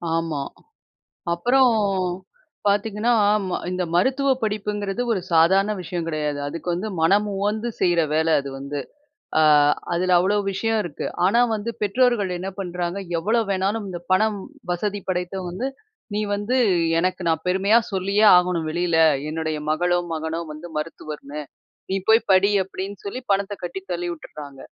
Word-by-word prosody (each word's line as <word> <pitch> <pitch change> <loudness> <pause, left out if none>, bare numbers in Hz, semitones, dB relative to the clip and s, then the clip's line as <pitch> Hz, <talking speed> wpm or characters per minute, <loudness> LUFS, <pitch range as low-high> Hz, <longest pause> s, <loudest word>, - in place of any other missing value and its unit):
ஆமா 165 -3 -1 0.9
அப்புறம் 245 +8 +4 0.9
பார்த்தீங்கன்னா, 210 +3 +1 0.6
இந்த 180 0 -1
மருத்துவ 265 +10 +2
படிப்புங்கிறது 210 0 -2
ஒரு 200 - 0
சாதாரண 190 +6 +4
விஷயம் 175 -1 -4
கிடையாது. 150 -2 -2
அதுக்கு 165 +5 -6
வந்து 190 +5 -3
மனம் 200 +6 +3
உவந்து 210 +4 -1
செய்ற 175 -2 +3
வேல 160 0 +3
அது 140 0 -7
வந்து. 140 +1 -4 0.6
ஆ - - +5 0.5
அதில 180 +1 +2
அவ்வளோ 200 +3 +2
விஷயம் 225 +3 0
இருக்கு. 175 - -6 0.2
ஆனா 200 +6 +4 0.2
வந்து 215 +2 -4
பெற்றோர்கள் 215 -2 +2
என்ன 185 +2 -4
பண்றாங்க? 180 0 -3 0.2
எவ்வளோ 220 +7 +1
வேணாலும் 200 +3 -1
இந்த 175 -2 -5
பணம் 215 +2 +3 0.3
வசதி 205 +3 -2
படைத்தவங் 180 0 -2
வந்து 240 +9 -3 0.5
நீ - - 0 0.2
வந்து 205 +5 -1 0.4
எனக்கு 185 +2 -1
நான் 160 -1 0
பெருமையா 195 +4 +4 0.2
சொல்லியே 200 +3 +2
ஆகணும் 180 -3 +1
வெளில. 170 0 0 0.3
''என்னுடைய 155 0 -2
மகளோ, 175 +3 +2 0.2
மகனோ 160 +1 -3
வந்து 155 +3 -9
மருத்துவர்ன்னு 150 -2 -6 0.5
நீ 190 - +1
போய் 220 +1 +7
படி'' 200 +2 +4
அப்டின்னு 195 +1 -7
சொல்லி 250 +6 -4
பணத்த 200 +1 0
கட்டி 175 +2 -4
தள்ளி 175 0 -3
விட்டுடுறாங்க. 145 -4 -10
185 Hz, 140 wpm, -23 LUFS, 165-205 Hz, 0.9 s, போய்